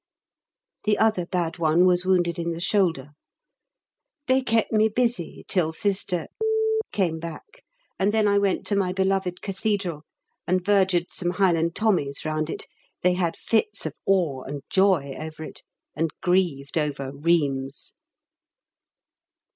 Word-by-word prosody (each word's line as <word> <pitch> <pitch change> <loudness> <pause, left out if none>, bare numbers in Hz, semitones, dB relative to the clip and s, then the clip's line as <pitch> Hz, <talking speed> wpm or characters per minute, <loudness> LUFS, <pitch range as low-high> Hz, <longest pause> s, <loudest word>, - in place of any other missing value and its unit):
The 210 -1 +3
other 215 -6 +2
bad 175 -2 -2
one 165 +2 +4
was 180 0 +2
wounded 175 -2 +2
in 170 0 -1
the 165 - -6
shoulder. 170 -7 +1 1.1
They 260 +1 +3
kept 225 -3 +1
me 215 0 +4
busy 235 -5 -1
till 170 -4 +1
Sister 185 -1 -1 0.6
came 170 -5 0
back, 170 - -9 0.4
and 195 +2 +3
then 215 -1 +2
I 200 0 +4
went 200 -2 0
to 205 - 0
my 185 -2 +1
beloved 190 -1 0
Cathedral 195 -5 -2 0.5
(and 185 0 +1
vergered 190 -3 +2
some 175 - -2
Highland 170 -3 +2
Tommies 180 -12 +1
round 155 0 -1
it, - - -5 0.4
they 180 0 +4
had 175 -2 -1
fits 230 - 0
of - - -3
awe 170 -9 +2
and 140 +2 -7
joy 185 -8 +3
over 155 0 -7
it, - - -9 0.3
and 160 +1 0
grieved 175 -6 +1
over 140 -3 -2
"Reems"). 140 -3 0
180 Hz, 140 wpm, -25 LUFS, 160-195 Hz, 1.1 s, one